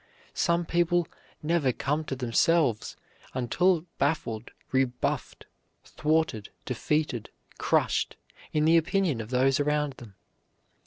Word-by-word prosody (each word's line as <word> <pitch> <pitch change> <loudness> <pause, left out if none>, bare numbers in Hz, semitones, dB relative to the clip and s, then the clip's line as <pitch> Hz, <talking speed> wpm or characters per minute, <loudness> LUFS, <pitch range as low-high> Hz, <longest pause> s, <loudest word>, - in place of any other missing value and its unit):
Some 170 0 +1
people 175 0 +2 0.4
never 155 -4 +2
come 150 +5 -1
to 135 - -3
themselves 130 0 +1 0.4
until 165 +7 +2
baffled, 130 -6 -1 0.2
rebuffed, 130 -2 -1 0.4
thwarted, 155 -9 0 0.2
defeated, 130 -1 -1 0.3
crushed, - - +1 0.4
in 150 0 +2
the 165 +1 +6
opinion 165 - +1
of 110 - -8
those 130 +2 +3
around 150 -1 +1
them. 110 -5 -12
150 Hz, 105 wpm, -28 LUFS, 125-165 Hz, 0.4 s, the